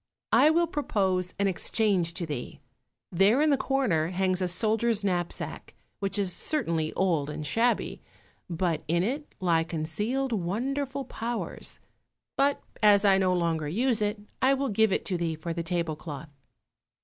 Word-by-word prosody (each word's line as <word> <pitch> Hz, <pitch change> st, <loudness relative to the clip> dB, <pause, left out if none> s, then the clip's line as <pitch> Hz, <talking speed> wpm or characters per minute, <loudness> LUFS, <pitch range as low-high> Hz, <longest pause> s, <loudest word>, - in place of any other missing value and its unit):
I 300 Hz, -, +6 dB
will 340 Hz, +2 st, +3 dB
propose 190 Hz, -, -1 dB
an 200 Hz, -, +1 dB
exchange 190 Hz, -2 st, 0 dB
to 170 Hz, -, -3 dB
thee; 145 Hz, -6 st, -6 dB, 0.5 s
there 195 Hz, +8 st, +4 dB
in 305 Hz, 0 st, +4 dB
the -, -, +5 dB
corner 255 Hz, -, +1 dB
hangs 185 Hz, +1 st, 0 dB
a 185 Hz, -, +1 dB
soldier's 220 Hz, +3 st, +1 dB
knapsack, 175 Hz, -3 st, -2 dB, 0.2 s
which 195 Hz, 0 st, 0 dB
is 195 Hz, -3 st, 0 dB
certainly 165 Hz, -, 0 dB
old 165 Hz, -6 st, +1 dB
and 150 Hz, 0 st, -5 dB
shabby, 230 Hz, +10 st, +1 dB, 0.5 s
but 170 Hz, -2 st, -1 dB
in 170 Hz, +2 st, +2 dB
it 280 Hz, +8 st, -4 dB
lie 170 Hz, -3 st, +2 dB
concealed 205 Hz, +12 st, -2 dB
wonderful 265 Hz, +9 st, -2 dB
powers; 235 Hz, -1 st, -5 dB, 0.6 s
but, 280 Hz, +1 st, +1 dB, 0.2 s
as 205 Hz, -1 st, +6 dB
I 195 Hz, -1 st, +5 dB
no 185 Hz, -1 st, +2 dB
longer 165 Hz, -3 st, 0 dB
use 230 Hz, -, +1 dB
it, 210 Hz, +1 st, 0 dB, 0.2 s
I 270 Hz, +1 st, +4 dB
will 275 Hz, 0 st, -1 dB
give 220 Hz, 0 st, +3 dB
it -, -, 0 dB
to 180 Hz, -3 st, -1 dB
thee 165 Hz, -2 st, -1 dB
for 165 Hz, +2 st, -5 dB
the 170 Hz, -, -3 dB
table 165 Hz, -2 st, -2 dB
cloth." 150 Hz, -1 st, -8 dB
190 Hz, 160 wpm, -28 LUFS, 170-235 Hz, 0.6 s, I